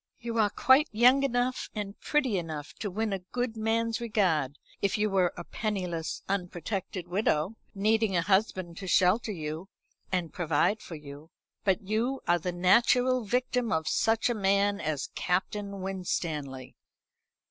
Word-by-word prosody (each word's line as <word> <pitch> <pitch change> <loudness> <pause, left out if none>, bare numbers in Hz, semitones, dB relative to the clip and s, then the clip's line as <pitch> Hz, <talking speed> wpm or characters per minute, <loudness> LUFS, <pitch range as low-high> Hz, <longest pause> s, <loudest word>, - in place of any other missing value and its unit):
You 230 -1 -3
are 210 -2 +4
quite 260 +8 +4
young 245 +5 +5
enough 255 -1 0
and 205 -1 -4
pretty 265 -10 +1
enough 155 -4 -6
to 205 - -2
win 215 +2 -1
a 195 - -2
good 235 +6 -3
man's 225 +1 0
regard, 175 - +1 0.2
if 200 - +1
you 210 0 +1
were 185 -3 +3
a 175 - -5
penniless 180 -6 -3
unprotected 185 0 -3
widow, 180 0 0 0.2
needing 215 0 +2
a 170 - +2
husband 190 -3 +1
to 195 - -6
shelter 190 +6 +3
you 160 +1 -5 0.4
and 180 -3 -1
provide 175 +5 +1
for 165 - -8
you. 150 +1 -11 0.3
But 200 0 +1
you 230 +7 -1
are 175 0 +4
the 180 +2 -2
natural 235 +7 +3
victim 250 0 0
of 160 -1 0
such 225 0 +2
a 240 - +1
man 200 -1 +2
as 155 -3 -2
Captain 200 +2 -2
Winstanley." 160 -8 -3
195 Hz, 150 wpm, -29 LUFS, 175-225 Hz, 0.4 s, young